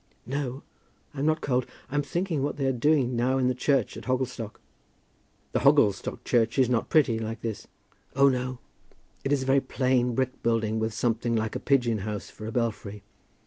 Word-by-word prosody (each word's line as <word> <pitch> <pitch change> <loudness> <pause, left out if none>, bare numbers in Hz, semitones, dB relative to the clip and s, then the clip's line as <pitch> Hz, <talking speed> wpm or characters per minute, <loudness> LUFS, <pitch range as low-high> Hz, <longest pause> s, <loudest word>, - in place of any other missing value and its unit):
"No; 135 0 -3 0.5
I'm 145 +1 -1
not 155 0 +1
cold. 125 -2 0 0.2
I'm 145 +1 +1
thinking 170 +1 -2
what 145 +1 -2
they 140 - -1
are 135 - +3
doing 130 -1 +2
now 125 +3 +1
in 130 -1 +2
the - - +1
church 130 -1 +1
at - - -9
Hogglestock." 125 -4 -2 0.9
"The - - +1
Hogglestock 100 -2 +3
church 115 0 +1
is 130 -2 +3
not 115 -2 0
pretty; 135 -8 +3
like 115 +1 -5
this?" 110 -4 -5 0.5
"Oh, 140 +1 +6
no. 130 -1 0 0.7
It 135 - -1
is 140 -2 +2
a - - -5
very 135 +1 +4
plain 125 -3 +1
brick 130 0 -1
building, 110 -1 +1
with 110 0 -2
something 115 0 0
like 110 -1 -1
a - - -1
pigeon 125 -6 +2
house 105 +1 -5
for 110 - -8
a - - -4
belfry. 105 -3 -3
125 Hz, 185 wpm, -27 LUFS, 115-135 Hz, 0.9 s, Oh